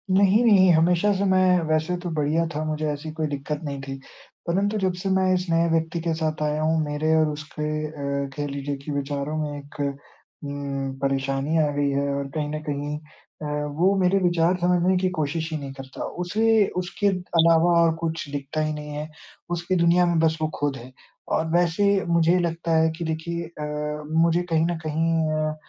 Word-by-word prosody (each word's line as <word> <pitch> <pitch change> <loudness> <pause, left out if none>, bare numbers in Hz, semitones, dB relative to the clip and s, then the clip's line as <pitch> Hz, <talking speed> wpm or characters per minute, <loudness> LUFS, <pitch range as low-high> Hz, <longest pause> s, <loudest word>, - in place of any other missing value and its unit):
नहीं, 200 +4 +5
नहीं। 195 -5 +6
हमेशा 175 +5 +3
से 195 0 -1
मैं 185 -1 +4
वैसे 155 +3 +1
तो 175 - -3
बढ़िया 155 +3 +1
था, 155 - -1
मुझे 155 0 -2
ऐसी 150 +2 -6
कोई 155 -1 -2
दिक्कत 145 +1 -4
नहीं 140 -2 -4
थी। 135 0 -6 0.5
परंतु 200 +5 +1
जब 185 -2 +1
से 195 - -2
मैं 190 0 +3
इस 180 0 0
नए 165 0 +3
व्यक्ति 165 +1 0
के 165 0 -1
साथ 155 -1 -2
आया 150 0 0
हूँ, 160 +1 +2
मेरे 150 +1 0
और 155 -1 +4
उसके 150 0 -5 0.2
अ, 140 -2 -3
कह 145 0 -2
लीजिए 140 0 -4
कि 150 - -5
विचारों 140 +1 -2
में 145 -1 -3
एक 145 +1 -12
उम, 140 -1 -5
परेशानी 135 +2 0
आ 150 - +1
गई 145 0 +1
है, 140 +1 0
और 140 0 -2
कहीं 150 -1 -1
न 155 - -3
कहीं 145 +1 -3
अ, 155 0 -15 0.3
वो 190 +4 +3
मेरे 185 +1 +3
विचार 175 -1 +2
समझने 180 +1 +3
की 185 0 +1
कोशिश 160 +2 -2
ही 155 - -1
नहीं 140 -2 -7
करता। 135 -1 -8 0.2
उसे 220 +3 +3
उसके 180 +3 -1
अलावा 170 -3 +3
और 165 -1 +4
कुछ 165 -2 -3
दिखता 145 +2 -3
ही 155 0 -1
नहीं 150 0 -7
है, 150 +1 -5 0.4
उसकी 175 +2 -1
दुनिया 175 +1 +5
में 170 -1 +1
बस 160 0 +2
वो 155 - +2
खुद 145 -1 0
है। 125 +2 -11 0.5
और 160 - -1
वैसे 175 +3 +2 0.2
मुझे 170 +1 +3
लगता 170 -1 -1
है 160 0 +4
कि 170 - -4
देखिए 165 +2 -3
अ, 160 -2 -9 0.6
मुझे 170 +1 +3
कहीं 160 0 +2
न 170 -1 -1
कहीं 165 +2 +1 0.4
अ, - - -7
160 Hz, 195 wpm, -24 LUFS, 145-175 Hz, 0.6 s, नहीं